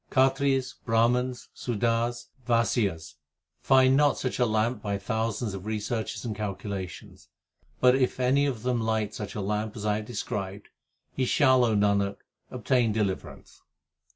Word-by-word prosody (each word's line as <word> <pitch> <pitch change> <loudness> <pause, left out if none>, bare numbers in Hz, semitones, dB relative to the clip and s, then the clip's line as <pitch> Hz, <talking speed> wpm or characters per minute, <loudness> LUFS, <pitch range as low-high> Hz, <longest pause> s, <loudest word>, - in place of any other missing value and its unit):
Khatris, 135 0 +2
Brahmans, 125 +2 +1
Sudars, 120 +1 -1
and 130 - -29
Vaisyas 100 -10 0 0.4
Find 130 0 +5
not 145 0 +3
such 130 - -3
a 125 - +3
lamp 110 +3 0
by 100 -1 -2
thousands 110 +1 -2
of 95 +1 -7
researches 110 0 -3
and 110 -3 -3
calculations; 100 -2 -6 0.5
But 125 0 +6
if 130 -1 +1
any 135 +3 +3
of 120 -5 -4
them 125 -2 0
light 110 -1 -1
such 105 -1 -6
a 105 - -2
lamp 105 +2 -2
as 105 - -5
I 105 0 +1
have 105 - -5
described, 100 -3 -5 0.4
He 130 - 0
shall, 130 -2 +4
O 115 -3 +2
Nanak, 100 -1 +2 0.3
obtain 125 -1 +1
deliverance. 105 -3 -4
115 Hz, 150 wpm, -27 LUFS, 105-125 Hz, 0.5 s, But